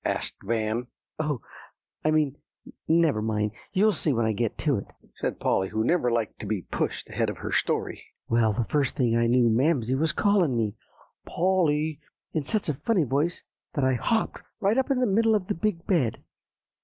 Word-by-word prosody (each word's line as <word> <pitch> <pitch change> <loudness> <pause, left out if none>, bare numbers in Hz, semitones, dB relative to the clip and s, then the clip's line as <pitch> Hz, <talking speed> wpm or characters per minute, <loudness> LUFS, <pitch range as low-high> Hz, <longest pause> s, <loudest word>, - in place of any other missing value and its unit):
asked - - -1
Van. 115 +1 -1 0.3
"Oh! 150 -6 -1 0.6
I 155 - +2
mean 155 -3 +2 0.5
never 160 -8 +3
mind, 105 -1 0 0.2
you'll 210 +3 +4
see 160 -4 0
when 115 -3 +1
I 110 - +2
get 110 +1 -1
to - - +1
it," - - -9 0.3
said - - -3
Polly, 95 0 +1
who 110 +1 -1
never 125 -2 +2
liked 115 -2 -1
to 105 - -6
be 100 -4 -2
pushed - - -3
ahead - - 0
of - - -5
her - - -5
story. - - -1 0.2
"Well, 115 -1 +3
the 110 +3 -1
first 140 -1 0
thing 120 -5 +2
I 115 0 +3
knew 120 0 +4
Mamsie 125 +1 +2
was 155 +4 +2
calling 180 - +2
me, 110 -3 0 0.5
'Polly,' 160 -4 +1 0.3
in 155 - +1
such 205 +9 -2
a 150 - +1
funny 195 - +1
voice, 145 +6 0 0.3
that 140 - +1
I 130 0 +3
hopped 220 - 0 0.2
right 205 +6 +2
up 265 - 0
into 265 -2 +2
the - - +4
middle 225 +2 +4
of 200 -3 0
the - - -1
big 170 -1 -2
bed. 155 - +1
145 Hz, 190 wpm, -26 LUFS, 115-170 Hz, 0.6 s, you'll